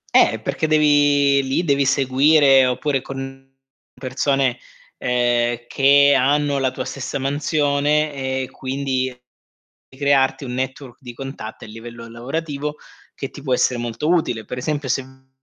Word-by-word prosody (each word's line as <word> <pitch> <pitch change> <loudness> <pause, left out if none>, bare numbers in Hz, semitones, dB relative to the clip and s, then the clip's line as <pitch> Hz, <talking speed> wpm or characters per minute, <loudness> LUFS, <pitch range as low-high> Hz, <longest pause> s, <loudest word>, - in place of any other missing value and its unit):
Eh, - - +5
perché 155 - -2
devi 145 -2 +4
lì 135 +6 -1
devi 140 -3 +2
seguire 135 0 +4
oppure 135 +1 -1
con 135 0 -8 0.5
persone, 130 -1 0 0.4
ehm, 120 -1 0
che 140 +1 +5
hanno 140 +1 +2
la 130 -1 +1
tua 130 - -6
stessa 140 +1 -5
mansione 145 +1 0
e 130 -1 -3
quindi 130 -1 -2 0.8
crearti 140 0 +1
un 125 -1 -5
network 130 0 -5
di 125 -2 -9
contatto 135 -5 -8
a - - -15
livello 115 +1 -10
lavorativo, 145 +5 -4 0.4
che 135 - -5
ti 145 - -12
può 130 -3 -2
essere 125 0 +2
molto 120 +6 -3
utile. 125 -11 0
Per 125 - -6
esempio 145 +1 -3
se 130 +3 0
uhm, 130 0 -19
135 Hz, 140 wpm, -20 LUFS, 130-145 Hz, 0.8 s, Eh